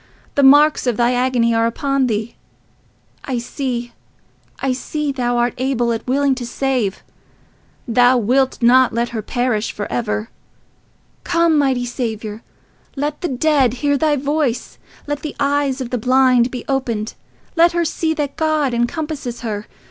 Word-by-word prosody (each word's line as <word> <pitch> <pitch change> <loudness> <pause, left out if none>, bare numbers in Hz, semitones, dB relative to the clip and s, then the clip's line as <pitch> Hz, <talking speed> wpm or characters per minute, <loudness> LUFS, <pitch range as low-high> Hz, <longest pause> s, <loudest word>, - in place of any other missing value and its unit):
The 285 - +2
marks 290 +1 +5
of 240 -3 +1
thy 240 +1 +2
agony 245 -2 +2
are 225 0 +2
upon 275 +2 0
thee—I 230 +3 -7
see, 240 -1 -4 0.7
I 270 -1 0
see 295 +3 -3
thou 245 -2 -1
art 240 0 +1
able 250 -2 0
and 225 - -2
willing 275 +1 +2
to 255 -1 -5
save—thou 245 0 -1
wilt 255 +3 +1
not 255 +1 +5
let 235 +1 0
her 225 -2 -4
perish 235 -1 -1
for 205 - -5
ever. 220 -1 -2 0.9
Come, 335 -2 +2
mighty 265 -4 +1
Saviour! 220 -3 -4 0.5
Let 295 +1 -3
the 355 - -1
dead 270 -3 +2
hear 285 0 +3
thy 300 +1 +2
voice. 280 -3 -2 0.3
Let 290 0 -3
the 305 - -6
eyes 280 -1 0
of 245 -1 -5
the 250 - -1
blind 255 0 +3
be 250 -1 -7
opened. 235 -6 -2 0.4
Let 340 +1 +5
her 345 -1 +1
see 320 0 -1
that 290 -3 -3
God 310 -4 +1
encompasses 265 +1 -3
her. 210 -3 -4
255 Hz, 150 wpm, -19 LUFS, 235-285 Hz, 0.9 s, marks